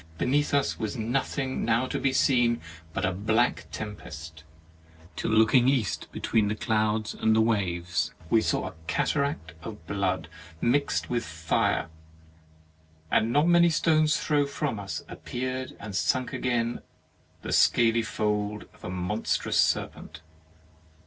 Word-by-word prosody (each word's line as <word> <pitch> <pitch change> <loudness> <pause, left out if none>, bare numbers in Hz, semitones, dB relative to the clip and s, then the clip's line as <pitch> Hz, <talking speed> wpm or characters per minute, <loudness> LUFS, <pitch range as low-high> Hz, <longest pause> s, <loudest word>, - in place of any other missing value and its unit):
Beneath 145 - +1
us 140 -1 +1
was 110 -2 -3
nothing 130 +3 -1
now 115 +2 +2
to - - -3
be 135 - +1
seen 120 -3 +3 0.3
but - - -1
a 95 - +1
black 105 -2 +1
tempest, 80 -7 -8 0.7
till - - -2
looking 115 +3 +5
East 125 -8 -1
be - - -7
tween 110 -3 +2
the 105 - -1
clouds 110 0 0
and 110 0 +2
the - - +4
waves, 90 -7 0 0.2
we 110 +6 +4
saw - - 0
a - - -7
cataract 140 - -1
of 105 -3 -9
blood 95 -3 -1 0.3
mixed 135 - +1
with 120 -1 0
fire, 80 -2 0 1.2
and 115 - +3
not 145 +5 +3
many 175 0 +6
stones' 155 -1 +3
throw 145 -2 +1
from 140 -5 -2
us 100 -1 -5
appeared 130 +1 -5
and 100 -1 -7
sunk 130 +6 0
again 120 -2 -1 0.6
the - - -3
scaly 115 -1 +4
fold 105 -1 -2
of - - -22
a - - -5
monstrous 90 +4 -1
serpent. 80 0 -2
110 Hz, 140 wpm, -27 LUFS, 100-130 Hz, 1.2 s, many